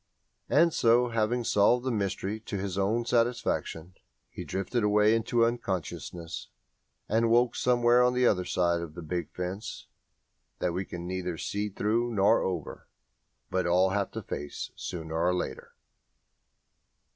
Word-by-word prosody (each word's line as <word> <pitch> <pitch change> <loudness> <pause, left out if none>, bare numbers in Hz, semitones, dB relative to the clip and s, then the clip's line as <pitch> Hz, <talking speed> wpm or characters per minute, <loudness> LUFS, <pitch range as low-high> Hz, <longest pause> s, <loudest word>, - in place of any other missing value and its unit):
_" - - -48 0.6
And 170 0 +5
so, 120 +1 +4
having 115 +2 0
solved 120 +4 +3
the 130 - 0
mystery 100 0 -2
to 105 -2 -5
his 95 -1 -3
own 105 +5 0
satisfaction, 115 -8 0 0.4
he - - -7
drifted 100 +5 -2
away 105 +1 +4
into 115 +1 +2
unconsciousness 90 -6 -4 0.6
and 115 +2 +2
woke 120 +1 +3
somewhere 120 0 +4
on 125 0 +3
the 125 0 +3
other 90 -6 +3
side 85 -1 +1
of 80 -2 -7
the 85 - -7
big 85 0 -3
fence 95 +4 -5 0.7
that 90 - -1
we 95 +2 -2
can 85 -1 -7
neither 90 -1 -3
see 105 +4 -2
through 115 +4 0
nor 100 +3 +4
over, 90 -5 -4 0.6
but 95 -1 0
all 90 +2 +3
have 100 0 0
to - - -5
face 75 0 -5
sooner 80 -2 -6
or 90 +2 +2
later. 90 - -5
100 Hz, 150 wpm, -28 LUFS, 90-115 Hz, 0.7 s, And